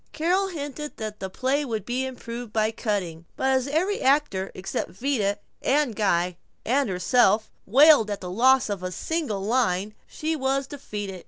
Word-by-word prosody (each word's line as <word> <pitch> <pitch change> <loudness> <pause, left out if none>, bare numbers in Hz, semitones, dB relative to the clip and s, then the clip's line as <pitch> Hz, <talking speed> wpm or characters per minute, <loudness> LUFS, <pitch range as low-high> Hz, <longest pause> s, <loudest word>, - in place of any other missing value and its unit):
Carol 360 +5 +1
hinted 300 -4 -6
that 215 -1 -6
the 190 - -4
play 265 +8 0
would 220 -7 -3
be 255 +3 -1
improved 240 -2 -7
by 220 0 +1
cutting, 190 -7 -3
but 265 - 0
as 260 0 +1
every 355 +8 0
actor 265 -9 +2
except 185 -2 -3
Vida 205 0 -1 0.2
and 280 -4 +1
Guy 180 -4 +1 0.3
and 270 +1 +2
herself 205 +3 +2 0.2
wailed 275 0 +6
at 205 -1 -3
the 180 -2 -6
loss 260 +6 +4
of 200 -3 -3
a 185 0 -4
single 250 - -2
line, 210 -3 +1
she 320 +1 -3
was 270 -1 0
defeated. 205 -9 -6
235 Hz, 165 wpm, -25 LUFS, 200-280 Hz, 0.3 s, wailed